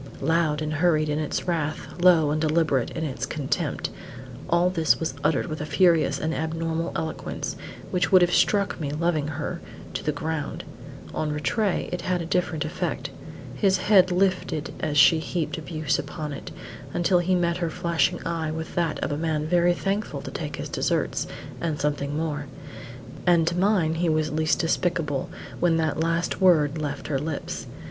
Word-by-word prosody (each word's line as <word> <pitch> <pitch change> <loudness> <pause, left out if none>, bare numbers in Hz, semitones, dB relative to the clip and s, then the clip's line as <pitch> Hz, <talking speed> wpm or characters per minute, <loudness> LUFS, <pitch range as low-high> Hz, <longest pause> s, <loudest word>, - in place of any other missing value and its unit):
Loud 155 0 +1
and 155 0 -2
hurried 155 -1 +2
in 150 +1 0
its 155 +3 -2
wrath, 160 0 -2
low 165 -5 +6
and 155 +1 0
deliberate 155 -5 +2
in 160 - -4
its 135 -3 -3
contempt, 145 -2 -2 0.6
all 175 +1 +3
this 165 -4 +2
was 160 -4 -2
uttered 160 - +2
with 155 -3 -5
a - - -2
furious 170 -5 +3
and 160 +1 -1
abnormal 165 +1 -2
eloquence, 160 -1 -3 0.4
which 180 +1 +1
would 185 -2 +7
have 175 - +2
struck 200 -3 +2
me, 145 - -2
loving 155 0 0
her, 155 +3 -4 0.3
to - - -3
the 150 - +1
ground. 150 0 -3 0.5
On 155 -1 -1
Rattray 150 - 0
it 180 -1 -3
had 180 0 0
a 170 - -3
different 170 -2 0
effect. 155 - -3 0.4
His 195 -2 +2
head 185 -1 +5
lifted 180 -4 0
as 150 -2 -1
she 160 +3 +7
heaped 160 0 -2
abuse 155 -1 -1
upon 150 +1 -5
it, 140 - -7 0.5
until 175 +1 +3
he 185 +1 +2
met 170 -1 +1
her 170 -2 -1
flashing 170 0 0
eye 165 -2 -1
with 160 +1 -5
that 170 -3 0
of - - -1
a 145 - -1
man 155 -1 -1
very 175 +1 +3
thankful 200 +4 -2
to - - -6
take - - -4
his - - -5
deserts - - 0 0.3
and 160 -3 -1
something 145 0 -1
more; 150 -2 -2 0.8
and 170 -2 +5
to 170 +1 0
mine 185 -4 +2
he 170 +1 0
was 155 0 +1
least 155 0 +1
despicable 165 -4 0 0.3
when 170 -2 +3
that 160 -1 0
last 165 +3 0
word 160 -5 +4
left 145 -1 -4
her 140 -3 0
lips. 150 0 -4
160 Hz, 175 wpm, -25 LUFS, 150-175 Hz, 0.8 s, would